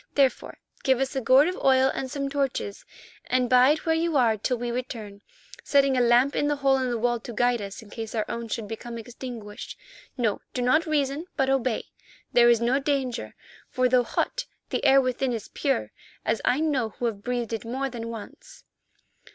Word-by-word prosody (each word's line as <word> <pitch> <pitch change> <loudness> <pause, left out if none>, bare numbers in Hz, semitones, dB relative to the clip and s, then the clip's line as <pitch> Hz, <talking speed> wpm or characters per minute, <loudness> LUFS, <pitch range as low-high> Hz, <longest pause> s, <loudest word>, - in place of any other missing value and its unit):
Therefore 270 -3 +1 0.3
give 265 -2 +3
us 270 0 -1
a 265 - 0
gourd 260 +5 +5
of 365 - -2
oil 265 0 +5
and 260 - -4
some 275 +1 -3
torches 275 -7 -2 0.4
and 255 -1 +2
bide 255 +5 +4
where 325 - +3
you 325 -1 +1
are 235 -4 +4
till 240 +4 -1
we 240 0 -3
return, 225 -5 -6 0.4
setting 275 -1 +3
a 250 - +3
lamp 245 +3 +4
in 290 - +1
the 295 - +1
hole 275 -1 +3
in 260 -1 -1
the 240 - -1
wall 240 +1 0
to 240 - -8
guide 245 0 +1
us 200 +2 -7
in 205 - -16
case 225 0 -6
our 215 - 0
own 235 0 -4
should 225 -1 -4
become 230 +2 -6
extinguished. 230 -2 -8 0.4
No, 225 -5 0
do 250 - 0
not 310 +7 +3
reason 295 +2 0
but 270 0 +2
obey. 255 -3 0 0.5
There 240 -1 +6
is 235 -2 +5
no 240 +4 +2
danger, 265 - -2 0.3
for 255 0 +2
though 250 0 +4
hot, - - -2 0.3
the - - -1
air 275 -1 +6
within 255 0 0
is 225 -3 -5
pure, 275 -3 -1 0.3
as - - 0
I 260 +5 +2
know 275 -8 +1
who 240 - -5
have 215 -4 -2
breathed 240 -1 -2
it 225 - -3
more 260 +4 -2
than 235 -3 -6
once." 225 -2 -10
250 Hz, 200 wpm, -26 LUFS, 235-270 Hz, 0.5 s, There